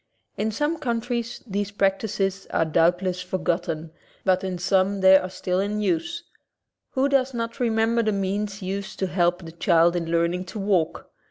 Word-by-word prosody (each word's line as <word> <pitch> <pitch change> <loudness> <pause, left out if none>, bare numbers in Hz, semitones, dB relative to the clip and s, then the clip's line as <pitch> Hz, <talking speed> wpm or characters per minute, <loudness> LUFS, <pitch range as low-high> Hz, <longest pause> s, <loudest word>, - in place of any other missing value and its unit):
In 220 +1 -1
some 295 +8 -1
countries 235 -2 -2
these 205 -2 -2
practices 195 -1 -1
are 165 - +1
doubt 170 +3 +2
less 180 -1 -1
forgotten, 175 -3 -2 0.3
but 185 -1 +3
in 185 -1 -3
some 190 +2 +1
they 190 0 +8
are 185 -1 +3
still 185 0 -2
in 205 +2 -1
use. 340 +8 -1 0.7
Who 265 +1 +2
does 270 -2 +1
not 230 0 -4
remember 230 -1 +2
the 215 -1 +1
means 200 +1 -2
used 195 +1 -4
to 190 - 0
help 175 -1 +1
the 165 - -8
child 170 0 +3
in 165 -2 -2
learning 170 +2 +1
to 190 - -8
walk? 195 -5 0
195 Hz, 170 wpm, -24 LUFS, 180-220 Hz, 0.7 s, they